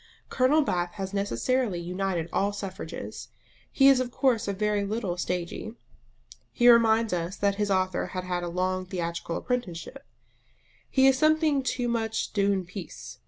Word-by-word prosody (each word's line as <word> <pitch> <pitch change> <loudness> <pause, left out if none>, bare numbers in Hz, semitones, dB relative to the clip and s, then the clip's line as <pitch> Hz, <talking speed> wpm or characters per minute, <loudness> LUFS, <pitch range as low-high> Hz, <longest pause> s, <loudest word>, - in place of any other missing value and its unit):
Colonel 275 +5 +3
Bath 175 -8 -1
has 195 -2 -5
necessarily 200 - 0
united 180 -1 -2
all 200 +1 +1
suffrages. 195 -1 -7 0.4
He 270 - +5
is 270 -2 +6
of 255 -1 -1
course 245 -4 +1
a 200 - 0
very 210 +1 0
little 200 -3 -2
stagey; 180 +5 -4 0.8
he 240 - +3
reminds 230 -2 +5
us 175 +2 -2
that 200 -1 0
his 205 - 0
author 185 -1 0
had 185 -1 -5
had 180 -1 -2
a 175 - -4
long 185 +1 -1
theatrical 170 -2 -3
apprenticeship: 250 +1 -4 0.9
he 265 -1 +4
is 265 -1 +5
something 310 -2 +3
too 250 -1 -1
much 225 -2 -2
d'une 200 -2 +1
piece. 180 -1 -9
200 Hz, 155 wpm, -27 LUFS, 180-245 Hz, 0.9 s, is